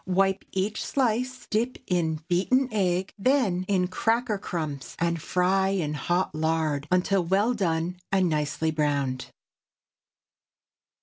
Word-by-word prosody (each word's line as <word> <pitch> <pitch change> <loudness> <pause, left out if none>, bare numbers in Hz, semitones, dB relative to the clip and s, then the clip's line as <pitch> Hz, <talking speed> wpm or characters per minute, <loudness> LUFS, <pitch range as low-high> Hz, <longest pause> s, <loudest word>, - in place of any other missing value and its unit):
Wipe 195 +1 +2
each 195 +3 -1
slice, 255 0 -1
dip 235 +4 0
in 160 -4 0
beaten 245 +9 +2
egg, 190 -3 0
then 200 -7 +2
in 185 -3 +2
cracker 225 +2 0
crumbs, 150 -9 -4
and 170 -1 0
fry 190 +3 +2
in 180 -6 -1
hot 175 +4 0
lard 155 -2 0
until 180 +1 +2
well 200 +7 +2
done 175 -4 -1
and 190 -2 +3
nicely 155 0 0
browned. 140 -4 -1
180 Hz, 120 wpm, -26 LUFS, 160-200 Hz, -, and